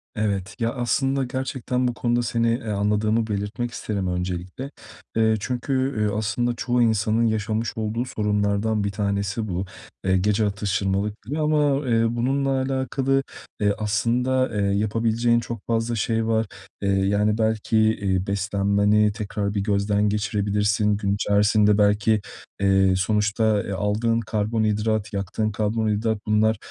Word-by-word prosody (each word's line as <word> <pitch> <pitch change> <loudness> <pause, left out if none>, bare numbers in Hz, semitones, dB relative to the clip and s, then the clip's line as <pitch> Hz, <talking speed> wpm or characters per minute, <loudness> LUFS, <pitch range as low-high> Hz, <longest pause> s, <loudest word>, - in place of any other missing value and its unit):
Evet. 100 -3 -2
Ya, 115 0 +1
aslında 135 +2 0
gerçekten 130 -1 -2
bu 120 - -1
konuda 120 0 0
seni, 115 0 0
eee, 115 -2 -4
anladığımı 105 +2 +1
belirtmek 105 +4 -3
isterim 100 -5 -3
öncelikle. 90 - -4 0.4
Eee, 110 -1 +3
çünkü, 125 +4 -3
üüü, 130 -6 0
aslında 110 +3 -1
çoğu 120 0 0
insanın 110 0 +2
yaşamış 110 +1 -1
olduğu 110 +3 -2
sorunlardan 105 0 0
bir 100 - -1
tanesi 100 +1 -2
bu, 90 +1 -2 0.4
eee, 95 0 +3
gece 105 +3 +1
atıştırmalık 100 0 -1
gibi 140 +9 -4
ama, 150 -2 +2
eee, 115 0 +3
bununla 135 +3 0
alakalı, 135 0 0 0.4
eee, 105 -1 +2
aslında, 120 +5 +1
eee, - - +1 0.2
yapabileceğin 115 +2 +1
çok 115 -2 -7
fazla 115 0 0
şey 115 +1 0
var, 110 0 +1 0.4
eee, 100 - 0
yani, 100 +2 +2
belki, 110 0 0
iii, 100 -4 +1
beslenmeni 100 +1 +2
tekrar 100 -1 -3
bir 100 - -1
gözden 105 0 +1
geçirebilirsin. 105 0 +1
Gün 100 -1 0
içerisinde 105 0 +3
belki, 105 +1 +3 0.4
eee, 95 -1 +4
sonuçta, 105 +1 +1
eee, - - -6
aldığın 105 +4 0
karbonhidrat, 110 -1 -1
yaktığın 100 +3 -2
karbonhidrat 110 +1 0
bunlar, 110 0 +3
110 Hz, 135 wpm, -23 LUFS, 100-115 Hz, 0.4 s, eee